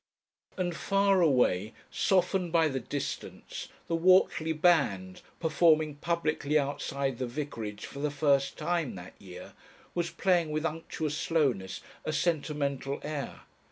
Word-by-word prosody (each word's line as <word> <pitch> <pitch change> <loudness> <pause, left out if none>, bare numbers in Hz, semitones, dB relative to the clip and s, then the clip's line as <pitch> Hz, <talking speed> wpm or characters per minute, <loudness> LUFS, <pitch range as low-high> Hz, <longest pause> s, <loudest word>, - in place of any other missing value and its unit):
And 175 -2 -1
far 195 0 +2
away, 120 - +3 0.2
softened 185 -1 +1
by 165 -2 +4
the 135 -2 -2
distance, 135 +3 -5 0.2
the 165 - 0
Whortley 170 -2 +4
band, 140 - +2 0.2
performing 155 -2 +3
publicly 155 -2 0
outside 140 -2 -2
the 130 - -1
vicarage 115 -6 -5
for 140 - -9
the 150 +1 0
first 140 -2 +1
time 165 - -1
that 90 0 -10
year, 90 -2 -10 0.4
was 170 -1 -1
playing 175 -4 +1
with 155 +1 -2
unctuous 155 -1 -3
slowness 130 - 0 0.2
a 155 - -2
sentimental 145 -4 -1
air. 150 -2 -5
150 Hz, 125 wpm, -29 LUFS, 135-170 Hz, 0.4 s, by